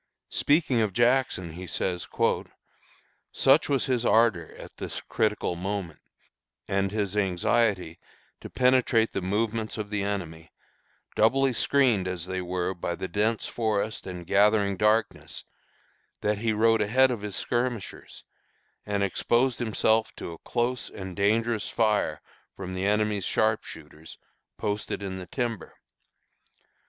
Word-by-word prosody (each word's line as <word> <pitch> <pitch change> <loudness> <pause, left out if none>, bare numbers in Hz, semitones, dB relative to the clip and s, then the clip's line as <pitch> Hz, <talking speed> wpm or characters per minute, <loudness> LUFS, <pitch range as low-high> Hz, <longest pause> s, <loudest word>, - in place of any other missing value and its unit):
Speaking 145 -5 +2
of 105 -3 0
Jackson, 120 -7 +2
he 90 +3 -8
says, 90 0 -2 1.2
"Such 135 +4 +4
was 140 -2 +1
his 125 -4 0
ardor, 110 -9 +2
at - - -12
this - - -5
critical 105 -4 -1
moment, 95 -2 -4 0.7
and 95 0 0
his 105 -2 -2
anxiety 100 -2 +1 0.4
to - - -9
penetrate 125 -3 +3
the 100 - -2
movements 110 +4 -1
of 105 -1 -5
the 105 -1 -1
enemy, 85 -5 -4 0.6
doubly 130 +4 +3
screened 120 -7 +2
as 90 -2 -3
they 95 0 -3
were 90 +1 -2
by 85 -1 -3
the 95 - -5
dense 105 +5 0
forest 110 -2 -2
and 90 -2 -7
gathering 100 +1 +3
darkness, 105 +3 0 0.8
that 105 0 0
he 115 0 0
rode 115 +1 +3
ahead 130 +5 +4
of 120 -4 -3
his 105 -2 -3
skirmishers, 120 -2 -3 0.6
and 100 -1 0
exposed 120 +6 +1
himself 110 -1 +1
to - - -6
a 85 - -10
close 120 +1 -2
and 95 -2 -8
dangerous 110 +2 +1
fire 110 -2 +1 0.3
from 95 -1 -6
the 95 +2 -1
enemy's 105 -1 +1
sharpshooters, 80 -8 -2 0.4
posted 105 -1 -3
in 95 -1 -4
the 90 - -8
timber. 120 -8 -4
105 Hz, 130 wpm, -27 LUFS, 95-115 Hz, 1.2 s, Such